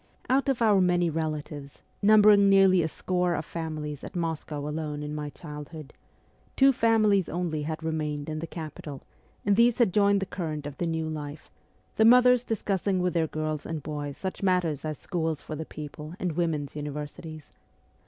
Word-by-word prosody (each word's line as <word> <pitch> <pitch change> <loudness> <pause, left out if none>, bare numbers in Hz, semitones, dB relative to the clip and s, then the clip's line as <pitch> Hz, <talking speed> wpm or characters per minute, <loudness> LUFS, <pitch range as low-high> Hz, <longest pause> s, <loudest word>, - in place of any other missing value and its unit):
Out 270 +1 +3
of 245 -3 +1
our 205 -4 +5
many 175 -2 +2
relatives, 150 -2 -5 0.2
numbering 205 -1 +6
nearly 195 -2 +6
a 160 - 0
score 180 +2 -1
of 155 - -3
families 155 -3 -5
at - - -9
Moscow 160 -3 -3
alone 150 -1 -4
in 150 0 -5
my 150 -1 -4
childhood, 150 -1 -9 0.6
two 270 0 +6
families 215 -6 +3
only 170 -3 -2
had 155 +2 -4
remained 150 -2 -2
in 155 -1 -3
the 165 - -5
capital, 155 -3 -8 0.4
and 200 0 +4
these 235 +2 +4
had 230 -8 +3
joined 200 -1 +4
the 195 - -2
current 155 -6 -4
of 145 -2 -7
the 175 - 0
new 160 -1 -1
life, 150 -1 -7 0.5
the 220 - +5
mothers 250 +1 +6
discussing 200 -4 -1
with 180 0 0
their 165 -2 +1
girls 155 -1 -3
and 160 -3 -5
boys 145 -2 -5
such 190 -1 -5
matters 180 -7 +1
as 155 -2 -3
schools 160 -4 -3
for 155 - -6
the 160 +1 -5
people 150 +2 -8
and 180 - -1
women's 155 -4 -2
universities. 150 +1 -7
160 Hz, 175 wpm, -27 LUFS, 150-190 Hz, 0.6 s, numbering